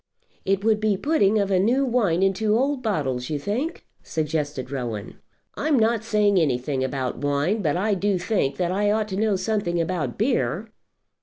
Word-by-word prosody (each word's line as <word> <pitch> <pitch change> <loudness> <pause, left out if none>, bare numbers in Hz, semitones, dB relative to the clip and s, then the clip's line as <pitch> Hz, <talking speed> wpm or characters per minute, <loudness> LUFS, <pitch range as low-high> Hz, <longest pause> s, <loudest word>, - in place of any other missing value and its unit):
"It 195 0 +1
would 220 -1 +3
be 215 -1 +1
a - - -5
putting 220 -7 +2
of 200 -1 0
new 230 +9 +3
wine 205 -8 +1
into 210 +3 +2
old 275 +1 0
bottles, 135 - -1
you 150 - -1
think?" 235 - -3 0.2
suggested 150 -4 -3
Rowan. 120 -7 -5 0.3
"I'm 300 -1 +1
not 225 -1 +2
saying 210 -3 +2
anything 130 -2 0
about 130 -1 -3
wine; 145 - 0
but 160 -2 0
I 205 +3 +1
do 195 0 +1
think 180 -6 -1
that 180 -1 0
I 205 +2 +1
ought 215 0 0
to 190 - -3
know 210 0 +1
something 190 -3 -1
about 165 -1 -2
beer." 210 - 0
195 Hz, 175 wpm, -24 LUFS, 150-220 Hz, 0.3 s, would